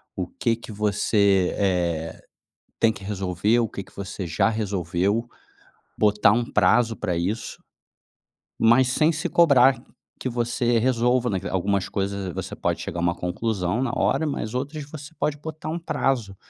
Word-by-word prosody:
O 90 - -2
que 115 +4 -1
que 115 0 -11
você, 100 -2 +2
eh, 85 -5 -1 0.6
tem 115 - +4
que 95 - -11
resolver; 100 +2 0
o 115 -2 0
que 100 - -6
que 95 - -22
você 100 -1 -5
já 85 +6 +2
resolveu. 100 0 -1 0.7
Botar 105 -1 +4
um 120 +2 +1
prazo 115 +3 +3
pra 90 - -2
isso. 95 +7 -3 1.0
Mas 120 +3 +5
sem 155 +5 +3
se 155 -1 -3
cobrar 135 -6 +5 0.4
que - - -2
você 120 0 0
resolva 125 +1 +2
naque 95 -1 -2
algumas 95 +1 0
coisas, 100 -1 -3
você - - -5
pode - - -2
chegar 85 - -5
a - - -2
uma 85 0 +1
conclusão 90 +3 -2
na 130 - 0
hora, 160 - +1
mas 125 -7 -3
outras 145 +4 -3
você 155 +1 -10
pode 150 -1 -1
botar 155 +1 -6
um 165 - -2
prazo, 125 - -1
110 Hz, 160 wpm, -24 LUFS, 95-125 Hz, 1.0 s, Mas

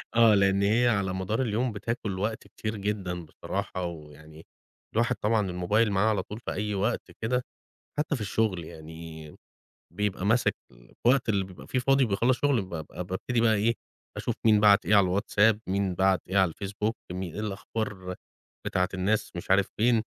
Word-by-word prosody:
آه، 115 -2 +7
لإن 100 0 +3
هي 115 +5 +3
على 100 -5 +1
مدار 95 +6 -1
اليوم 120 +1 0
بتاكُل 105 -2 -3
وقت 110 +3 -3
كتير 110 0 -5
جدًا 95 -4 -3
بصراحة 90 +3 -4
ويعني 80 -1 -10 0.5
الواحد 120 +2 +2
طبعًا 105 -1 +1
الموبايل 105 +5 +1
معاه 100 +3 +3
على 100 -4 0
طول 105 +3 -8
في - - -5
أي 105 +2 -2
وقت 100 +2 -1
كده 125 +3 0 0.6
حتّى 150 0 0
في 125 - -6
الشُغل 105 -4 0
يعني، 80 -1 -10 0.6
بيبقى 100 -2 -1
ماسِك 115 +4 +3 0.2
الوقت 115 - 0
اللي 100 -2 +2
بيبقى 95 -1 -12
فيه 130 - 0
فاضي 135 +2 +3
وبيخلّص 120 +3 +2
شُغله 140 -5 +3
بابقى 85 -2 -6
بابتدي 95 +6 -1
بقى 110 -1 +4
إيه، 110 +3 +2 0.4
أشوف - - -2
مين 110 -2 +6
بَعَت 105 -1 +5
إيه 105 - +4
على 95 -1 +4
الWhatsApp، 105 0 +3
مين 95 -1 0
بَعَت 95 +1 +3
إيه 95 - 0
على 95 -3 +4
الFacebook، 100 +3 -2 0.2
مين 90 -2 -4
إيه - - -5
الأخبار 100 -2 -4 0.5
بتاعة 90 0 +1
الناس 100 +3 0
مش 85 - -4
عارف 95 0 +4
فين؟ 115 0 +3
100 Hz, 170 wpm, -28 LUFS, 95-110 Hz, 0.6 s, آه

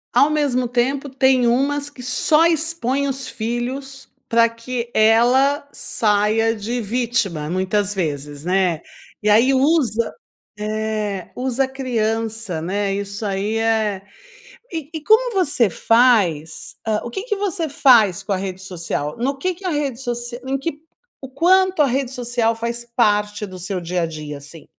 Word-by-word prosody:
Ao 290 - +5
mesmo 275 -5 +1
tempo 265 +3 0
tem 260 -2 +3
umas 280 +4 +1
que 255 -4 -12
só 300 +6 +3
expõem 315 -5 0
os 270 -1 -3
filhos 250 +4 -4 0.2
pra 230 0 +5
que 235 +1 -5
ela 250 +6 +4
saia 215 +1 +1
de 230 +4 -3
vítima 210 -9 -1
muitas 195 +3 0
vezes, 145 -4 -4
né? 180 -3 +1 0.4
E - - 0
aí 245 +6 +5
usa, 260 -6 +2 0.4
eh, 215 -2 -3
usa 260 +1 0
a - - -7
criança, 225 -7 -2
né? 195 +4 -1
Isso 200 +1 -5
aí 205 +2 -1
é 220 -3 0 0.7
e 320 -3 -5
e 315 - -4
como 470 +3 +4
você 285 - +3
faz, 190 -8 +2
ah, 215 -1 0
o 240 - -5
que 385 - -4
que 430 -3 -2
você 385 -5 -1
faz 220 -9 +4
com 205 - -2
a 195 - +1
rede 190 -1 -5
social, 170 -5 -4
no 270 +3 -1
que 365 +5 -1
que 385 - -17
a 365 - 0
rede 285 -5 -2
social 240 -1 -4
em 275 - 0
que 295 +1 -4 0.4
o 265 - -7
quanto 370 +4 +3
a 290 - +6
rede 260 0 -1
social 240 -2 -1
faz 235 +1 -3
parte 210 -2 +1
do 185 -1 -10
seu 185 0 -3
dia-a-dia, 165 -4 -4
assim? 150 +3 -11
235 Hz, 155 wpm, -20 LUFS, 205-270 Hz, 0.7 s, a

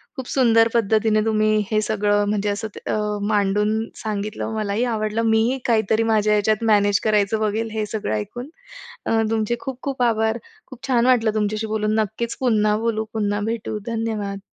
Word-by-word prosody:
खूप 260 -3 -6
सुंदर 230 -4 +4
पद्धतीने 220 -1 +2
तुम्ही 215 -1 +2
हे 215 - +3
सगळं 205 -1 +1
म्हणजे 210 0 0
असं 205 +2 -2
ते - - -7
अ, - - +1 0.3
मांडून 210 0 +1 0.2
सांगितलं. 215 0 -4
मलाही 215 +1 -1
आवडलं. 215 +1 -1
मीही 225 +3 +2
काहीतरी 220 -1 +2
माझ्या 215 -2 +2
ह्याच्यात 215 +1 +1
मॅनेज 205 -1 +3
करायचं 215 0 +2
बघेल, 220 +1 -1
हे 215 -1 -2
सगळं 210 - -3
ऐकून. 245 - -5 0.6
अ, 225 0 +2
तुमचे 225 +1 0
खूप 260 +1 -7
खूप 275 -2 -3
आभार. 220 -1 +1 0.3
खूप 260 +1 -10
छान 245 -2 +2
वाटलं 235 -4 +3
तुमच्याशी 215 +1 -1
बोलून. 215 0 -1
नक्कीच 220 +2 -2
पुन्हा 215 -4 +2
बोलू, 220 -1 -1
पुन्हा 205 -2 -1
भेटू. 225 -1 -4
धन्यवाद. 220 -3 -3
220 Hz, 165 wpm, -22 LUFS, 210-225 Hz, 0.6 s, सुंदर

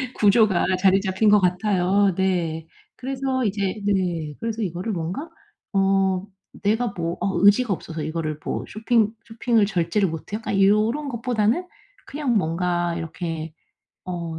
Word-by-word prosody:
구조가 205 -2 +4 0.2
자리 195 0 +5
잡힌 190 +2 +2
것 210 0 +6
같아요. 190 +1 +2
네. 170 -4 -1 0.3
그래서 260 -1 -2
이제 200 0 -1
네. 175 -6 0
그래서 230 0 -3
이거를 180 +3 -3
뭔가 185 - -4 0.4
어 195 -1 +2 0.4
'내가 220 +4 +2
뭐 170 0 -2
어 195 - 0
의지가 205 +2 +5
없어서 165 -2 -6
이거를 155 -1 -3
뭐 - - -3
쇼핑 220 0 +1
쇼핑을 225 -1 +1
절제를 185 0 +1
못 165 +5 -8
해.' - - +1
약간 205 -3 -2
요런 215 +9 +3
것보다는 235 - 0 0.4
그냥 280 -4 -1
뭔가 175 0 0
이렇게 165 -1 -5 0.5
어 170 -3 -5
195 Hz, 280 characters per minute, -23 LUFS, 175-220 Hz, 0.5 s, 것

